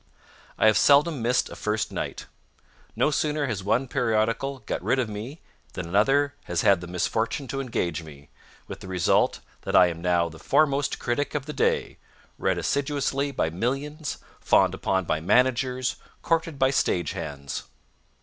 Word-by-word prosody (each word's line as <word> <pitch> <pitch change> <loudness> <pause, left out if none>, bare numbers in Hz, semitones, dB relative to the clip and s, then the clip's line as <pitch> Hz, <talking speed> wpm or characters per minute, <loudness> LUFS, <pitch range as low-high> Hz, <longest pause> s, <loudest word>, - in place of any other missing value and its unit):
I - - +2
have 110 -1 +5
seldom 145 0 +4
missed 120 +2 +1
a - - -7
first 105 0 -2
night. - - -5 0.7
No 150 - +2
sooner 150 0 0
has 105 -7 -3
one 115 +7 +1
periodical 115 +3 0
got - - -3
rid 135 - +1
of 125 -3 0
me 110 +9 -7 0.3
than 90 -3 -5
another 135 +10 +2
has 90 -1 -1
had 95 -3 +4
the 90 - -7
misfortune 110 - -1
to 135 - -2
engage 90 - -2
me, 70 -3 -13 0.4
with - - -8
the - - -10
result 90 -2 +1 0.2
that - - -3
I 90 - +7
am 85 -1 -7
now 85 -1 +2
the 80 -1 -11
foremost 140 -2 +2
critic 145 +5 -2
of 140 -3 -2
the 150 - -6
day, - - 0 0.4
read - - +1
assiduously 140 0 -1
by 100 -12 -1
millions, 140 - -3 0.2
fawned - - +3
upon 95 -1 -1
by 80 - 0
managers, 125 +6 +1 0.3
courted 165 -2 0
by 130 0 +3
stagehands. 75 - -2
120 Hz, 160 wpm, -25 LUFS, 90-140 Hz, 0.7 s, I